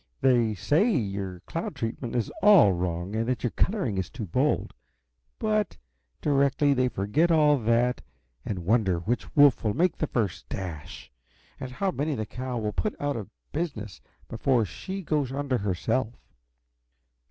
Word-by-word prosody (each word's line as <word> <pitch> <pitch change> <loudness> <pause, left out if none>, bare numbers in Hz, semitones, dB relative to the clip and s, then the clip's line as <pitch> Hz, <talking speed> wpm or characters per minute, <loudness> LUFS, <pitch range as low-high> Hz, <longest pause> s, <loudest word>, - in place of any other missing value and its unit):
"They 120 -5 +3
say 160 - +2
your 95 - -2
cloud 165 - -5
treatment 120 0 -4
is 115 -4 -1
all 195 - +7
wrong, 90 +2 -3
and 115 +1 0
that 125 -5 -1
your 120 - 0
coloring 155 - 0
is 95 - -3
too 115 -3 -6
bold 130 - 0 0.6
but 215 -2 0 0.4
directly 140 0 +3
they 130 -1 +2
forget 105 - +1
all 150 -3 +4
that 120 +2 +1 0.4
and 90 -5 -4
wonder 100 -3 +2
which 105 +9 -3
wolf 145 -4 +6
will 105 -2 0
make 175 +3 +2
the 155 - -1
first 100 - -2
dash, 85 -5 -7 0.5
and 130 - -5
how 195 +7 0
many 150 -1 -1
the 110 -3 -3
cow 125 +2 -5
will 105 -2 -2
put 215 - -2
out 145 -1 -1
of 105 -5 -6 0.2
business 110 - -4 0.3
before 120 0 +1
she 190 - -6
goes 150 -5 0
under 135 -2 -1
herself. 110 +5 -1
125 Hz, 155 wpm, -27 LUFS, 105-145 Hz, 0.6 s, all